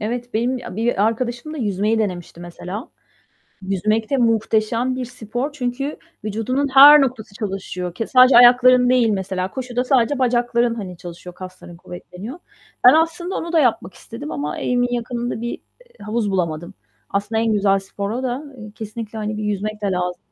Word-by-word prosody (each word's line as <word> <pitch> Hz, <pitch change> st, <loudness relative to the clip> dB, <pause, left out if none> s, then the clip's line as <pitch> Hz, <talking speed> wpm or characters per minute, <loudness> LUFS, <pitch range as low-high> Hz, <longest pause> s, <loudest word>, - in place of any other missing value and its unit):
Evet, 240 Hz, +2 st, -4 dB
benim 245 Hz, +4 st, 0 dB
bi 245 Hz, -, -10 dB
a 185 Hz, -, -8 dB
bir 225 Hz, -2 st, 0 dB
arkadaşım 240 Hz, +6 st, -3 dB
da -, -, -6 dB
yüzmeyi 210 Hz, -1 st, 0 dB
denemişti 180 Hz, -5 st, -4 dB
mesela. 180 Hz, +5 st, -7 dB, 0.7 s
Yüzmek 215 Hz, +3 st, -1 dB
de 275 Hz, -, +2 dB
muhteşem 230 Hz, +1 st, +1 dB
bir 255 Hz, -, -3 dB
spor 245 Hz, +3 st, -5 dB
çünkü 275 Hz, +1 st, -3 dB, 0.3 s
vücudunun 225 Hz, +7 st, -1 dB
her 290 Hz, +2 st, +10 dB
noktası 245 Hz, -6 st, -2 dB
çalışıyor. 190 Hz, -4 st, -5 dB
Ke 225 Hz, -, -3 dB
sadece 255 Hz, -1 st, +6 dB
ayakların 250 Hz, +1 st, +7 dB
değil 250 Hz, -2 st, +4 dB
mesela, 190 Hz, -2 st, -2 dB
koşuda 250 Hz, 0 st, -3 dB
sadece 265 Hz, +1 st, +2 dB
bacakların, 240 Hz, -1 st, +1 dB
hani, 190 Hz, -6 st, -7 dB
çalışıyor, 175 Hz, 0 st, -10 dB
kasların 185 Hz, -1 st, -11 dB
kuvvetleniyor. 180 Hz, -, -9 dB, 0.5 s
Ben 250 Hz, -, +10 dB
aslında 330 Hz, +3 st, 0 dB
onu 335 Hz, +1 st, -4 dB
da 330 Hz, -, +3 dB
yapmak 220 Hz, -8 st, 0 dB
istedim 190 Hz, -10 st, -9 dB
ama 150 Hz, 0 st, -4 dB
evimin 245 Hz, 0 st, 0 dB
yakınında 240 Hz, 0 st, -3 dB
bir, 235 Hz, +1 st, -4 dB, 0.4 s
ııı, -, -, -10 dB
havuz 215 Hz, -1 st, -1 dB
bulamadım. 170 Hz, -1 st, -2 dB, 0.4 s
Aslında 205 Hz, +3 st, -1 dB
en 225 Hz, -1 st, +1 dB
güzel 200 Hz, -1 st, +3 dB
spor 200 Hz, +1 st, -5 dB
o 245 Hz, +4 st, -3 dB
da. 255 Hz, +3 st, -3 dB
Eee, 215 Hz, -2 st, -9 dB
kesinlikle, 220 Hz, 0 st, -7 dB
hani, 215 Hz, 0 st, -3 dB
bir 215 Hz, -, -3 dB
yüzmek 210 Hz, +1 st, -3 dB
de -, -, 0 dB
lazım. 180 Hz, -1 st, -2 dB
225 Hz, 170 wpm, -20 LUFS, 195-250 Hz, 0.7 s, her